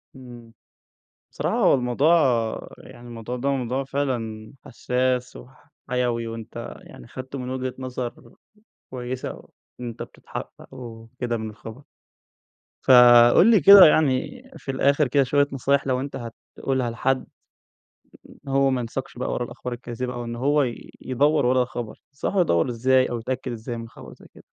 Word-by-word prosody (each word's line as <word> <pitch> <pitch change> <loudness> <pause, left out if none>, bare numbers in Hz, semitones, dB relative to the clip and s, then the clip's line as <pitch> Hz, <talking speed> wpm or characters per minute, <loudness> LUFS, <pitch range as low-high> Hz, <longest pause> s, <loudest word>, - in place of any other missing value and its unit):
إمم. 120 -3 -13 0.8
بصراحة - - -2
هو - - +4
الموضوع 135 +6 +2 0.6
يعني 120 - -14
الموضوع 120 +1 -6
ده 135 +3 -1
موضوع 130 0 -1
فعلًا 120 -6 -4
حساس 125 +1 -1
وح 130 +2 -15 0.2
حيوي، 120 -2 -1
وأنت 115 -1 -8
يعني - - -14
خدته 130 +1 -8
من 125 0 -5
وجهة 130 0 -3
نظر 125 -2 -6 0.6
كويسة 125 0 -6 0.4
وأنت 120 -2 -6
بتتحقق - - -10
وكده 120 0 -6
من 110 -1 -5
الخبر. 110 +4 -11 1.0
فَقُل 120 - +7
لي 215 -5 +5
كده، 200 -1 +10
يعني 155 - +2 0.2
في 135 - -5
الآخر 140 +2 +2
كده 140 +2 +3
شوية 145 +2 +2
نصايح 140 +1 0
لو 125 -1 +1
أنت 140 +2 -5 0.4
هتقولها 130 -3 -1
لحد، 130 +3 -1 1.0
إن - - -17
هو 135 0 +3
ما 130 -1 0
ينساقش 125 +2 -6
بقى 125 - -3
ورا - - -2
الأخبار 125 +1 -7
الكاذبة 120 +1 -5
أو 120 -1 -5
إن 115 0 -5
هو 145 +4 +2 0.4
يدور 145 +3 +1
ورا 130 +1 +3
الخبر، 120 -3 -7
تنصحه 180 +7 -1
يدور 85 - +1
إزاي 130 +2 +2
أو 120 - -3
يتأكد 130 +2 -4
إزاي 120 +1 -6
من 115 0 -8
خبر - - -13
زي - - -17
كده؟ - - -16
125 Hz, 150 wpm, -23 LUFS, 120-135 Hz, 1.0 s, كده